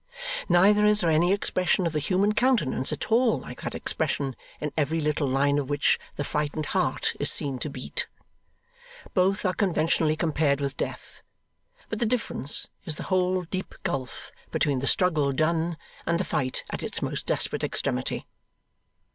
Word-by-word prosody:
Neither 205 +4 +5
is 210 0 +4
there 170 -2 +2
any 170 +4 +4
expression 185 -2 +1
of 165 - -1
the 155 - +1
human 190 +7 +2
countenance 230 - +2
at - - -4
all 235 0 +4
like - - -10
that - - -4
expression 135 -3 -2 0.2
in 150 - -3
every 155 +1 +1
little 150 -1 0
line 140 +2 +2
of 140 -1 -4
which 145 -1 +2 0.2
the 145 - -2
frightened 150 +1 -2
heart - - +1
is - - +4
seen 135 -3 +1
to 150 - -3
beat. 130 -2 -4 1.1
Both 195 +2 +2
are 185 - +2
conventionally 160 -4 +2
compared 150 -3 +1
with 140 -1 -2
death; - - -5 0.7
but - - -4
the 235 - +2
difference 220 - +1 0.2
is 155 - -3
the - - -6
whole 185 0 +2
deep 185 +2 -5
gulf 135 -8 -4 0.2
between 140 -3 +1
the 135 - -1
struggle 155 -8 +3
done, 160 +3 +1 0.3
and 170 0 +2
the - - +1
fight 135 -5 -1
at - - -4
its - - -2
most - - -3
desperate - - 0
extremity. 65 - -1
160 Hz, 165 wpm, -26 LUFS, 145-185 Hz, 1.1 s, Neither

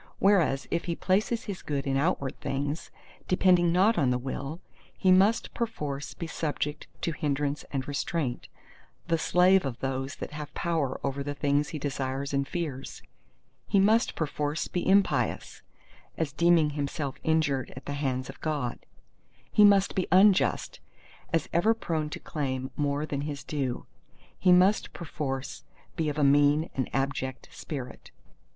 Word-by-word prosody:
Whereas 180 -9 +3
if 170 - -1
he 170 - -2
place 190 +5 +1
his 220 -5 -4
good 140 -2 -3
in 135 -1 0
outward 140 -2 0
things, 140 +3 -3 0.4
depending 180 -2 +4
not 195 +5 +4
on 135 -5 +3
the 125 - +2
will, 135 +5 -5 0.4
he 185 - +3
must 195 +5 +4
perforce 150 -12 -4
be 155 - -5
subject 150 -2 -3
to 165 - 0
hindrance 145 -1 -1
and 135 -1 -3
restraint, 145 -2 -2 0.6
the 165 -1 +2
slave 180 +3 +4
of 130 -4 -4
those 135 +1 -3
that - - -7
have 150 -1 -7
power 160 -6 -1
over 140 0 -2
the 145 +1 -4
things 145 +1 +1
he 155 - -5
desires 140 -1 -3
and 140 0 0
fears; 145 -7 -5 0.6
he 200 - +3
must 220 +4 +3
perforce 150 -1 -2
be 180 +1 -2
impious, 195 0 +1 0.6
as 155 -3 -2
deeming 170 -2 +4
himself 140 -1 -3
injured 155 -5 +1
at 130 - -10
the 145 - -3
hands 130 -3 -2
of 135 - -11
God; 145 -6 -2 0.7
he 210 - +5
must 200 -1 +5
be 185 - -1
unjust, 190 +2 +4 0.5
as 165 -2 +1
ever 215 +7 +3
prone 160 -8 -2
to - - -6
claim 130 -3 -3
more 145 0 0
than 140 -2 -3
his 145 -1 -5
due; 135 -5 -3 0.5
he 185 - +4
must 185 +4 +4
perforce 140 -5 -5 0.3
be 160 -2 0
of 150 - -4
a 150 - +2
mean 145 +3 +4
and 130 - -2
abject 135 -1 -2
spirit. 135 -5 -7
150 Hz, 155 wpm, -28 LUFS, 140-175 Hz, 0.7 s, he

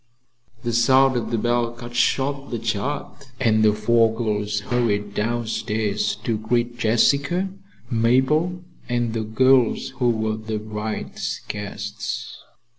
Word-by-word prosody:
The 120 -1 -1
sound 130 +3 +5
of 120 - -1
the 115 - 0
bell 120 +1 0
cut 120 0 -9
short 140 +3 +1
the 120 - -2
chat 135 +5 -3
and 110 -4 +3
the 105 - +6
four 115 +2 +3
girls 105 -2 -1
hurried 105 -3 0
downstairs 110 -2 -1
to 115 -3 -1
greet 120 +2 0
Jessica, 140 - +2 0.4
Mabel 130 +10 +2 0.3
and 120 -2 0
the 115 - -1
girls 125 +3 +3
who 125 -2 +3
were 110 -1 0
the 110 0 -4
Bright's 105 0 -4
guests. 105 -1 -5
115 Hz, 125 wpm, -23 LUFS, 110-125 Hz, 0.4 s, the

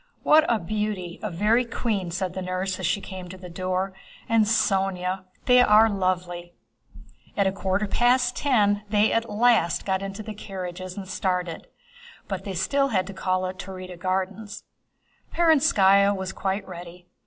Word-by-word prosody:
"What 310 +1 +6
a 230 - +3
beauty—a 210 -1 -3
very 210 +7 +2
queen!" 215 -6 -2
said 185 +1 -3
the 190 - -4
nurse 185 +1 -3
as 185 - -1
she 200 - 0
came 185 -2 -8
to 185 - -9
the 180 -1 -10
door. 185 +2 -2 0.3
"And 225 -1 +3
Sónya! 190 -3 0 0.2
They 250 -1 +6
are 220 -1 +6
lovely!" 180 -2 -2 0.8
At 200 - +3
a 190 - +2
quarter 195 +1 -1
past 245 +3 +2
ten 205 -7 +2
they 210 0 +3
at 230 0 0
last 215 -5 +2
got 190 -1 0
into 195 +2 -6
their 215 - -6
carriages 185 -2 -7
and 195 -1 -6
started. 180 -3 -2 0.6
But 195 -1 -5
they 200 - -4
had - - -4
still 275 +9 +1
to 195 -4 -1
call 185 -1 -1
at 185 0 -5
the - - -4
Taurida 185 -1 -8
Gardens. 190 +3 -3 0.7
Perónskaya 205 - +4
was 190 0 -4
quite 195 +1 -3
ready. 175 -1 -10
195 Hz, 165 wpm, -25 LUFS, 185-215 Hz, 0.8 s, What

